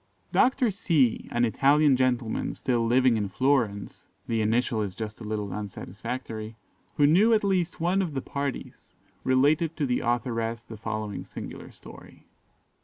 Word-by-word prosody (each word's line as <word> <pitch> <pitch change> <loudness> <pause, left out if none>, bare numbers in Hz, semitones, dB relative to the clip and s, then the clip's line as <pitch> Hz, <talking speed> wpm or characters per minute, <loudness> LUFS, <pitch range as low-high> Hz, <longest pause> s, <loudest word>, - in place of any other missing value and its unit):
"Dr. 255 -3 +3
C, 160 - +1
an 120 0 +2
Italian 140 +4 +4
gentleman 125 -3 0
still 120 -2 0
living 125 0 +4
in 105 -2 -2
Florence 115 -3 0 0.2
(the 115 -1 0
initial 110 +1 +1
is 100 -3 -4
just 110 0 -6
a - - -6
little 105 -2 -3
unsatisfactory), 110 +2 -6 0.4
who 145 - +5
knew 200 +10 +5
at 215 - +1
least 185 -4 0
one 180 +4 +2
of 165 -6 -3
the 135 - -1
parties, 140 -2 -5 0.3
related 150 +5 +2
to 150 - 0
the 125 -2 0
authoress 115 -1 -1
the 115 - -10
following 110 -1 -4
singular - - -9
story. - - -13
125 Hz, 150 wpm, -27 LUFS, 110-145 Hz, 0.4 s, who